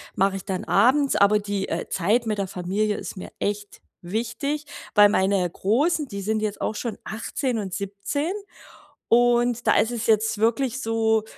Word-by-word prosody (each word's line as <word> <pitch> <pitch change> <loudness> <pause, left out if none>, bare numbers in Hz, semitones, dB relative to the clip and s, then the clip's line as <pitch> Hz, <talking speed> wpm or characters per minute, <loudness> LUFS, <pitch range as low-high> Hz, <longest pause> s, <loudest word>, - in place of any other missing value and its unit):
mache 195 -1 +2
ich - - -9
dann 190 -2 -3
abends, 265 +7 +3
aber 205 +1 +5
die, 200 -1 -3
äh, - - -3
Zeit 215 +6 +1
mit 215 -1 -1
der 195 - -1
Familie 195 +3 -1
ist - - -7
mir 185 - -8
echt 205 0 -3 0.2
wichtig. 280 - -3 0.3
Weil 205 -1 +8
meine 190 -3 +2
Großen, 290 - +1
die 200 -4 -6
sind 215 +2 -1
jetzt 210 -1 -3
auch 215 - -1
schon 230 0 -4
18 235 +3 -3
und 190 -3 -5
17 200 - -3 0.8
und 240 0 +3
da - - +5
ist 225 - +3
es 235 -1 -3
jetzt 220 0 +2
wirklich 250 +3 +1
so 225 -1 +1
215 Hz, 175 wpm, -24 LUFS, 200-240 Hz, 0.8 s, Weil